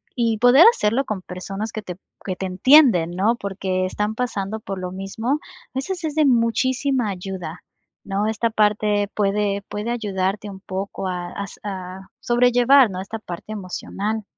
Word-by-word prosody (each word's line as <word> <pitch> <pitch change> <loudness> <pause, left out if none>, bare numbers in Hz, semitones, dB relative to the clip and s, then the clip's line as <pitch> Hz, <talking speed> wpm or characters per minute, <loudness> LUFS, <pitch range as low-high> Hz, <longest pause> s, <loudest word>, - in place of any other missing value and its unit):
Y 230 -3 +1
poder 245 +7 +7
hacerlo 230 - +1
con 210 -3 -3
personas 195 +4 -6
que 215 - -4
te 180 -3 -7
p 190 - -31 0.2
que 185 - -2
te 190 - -3
entienden, 190 - +5
¿no? 200 +6 +1
Porque 190 -3 -2
están 210 +3 -2
pasando 220 -3 -3
por 195 -3 -5
lo 180 0 -4
mismo. 195 +6 -4 0.4
A - - -5
veces 355 +6 -3
es 300 - -3
de 310 -1 +4
muchísima 255 0 +2
ayuda, 180 -3 -6 0.5
¿no? 200 +2 -1
Esta 220 +1 0
parte 210 -1 +1
puede 200 -1 0
puede 210 +3 -3
ayudarte 205 -3 -2
un 190 -1 -10
poco 190 0 -4
a 175 -1 -4
as 200 0 -7
a 190 -1 -6
sobrellevar, 245 +1 +5
¿no?, 185 -1 -5
esta 220 +4 -6
parte 180 +1 -8
emocional. 205 +2 -4
210 Hz, 165 wpm, -22 LUFS, 190-235 Hz, 0.5 s, poder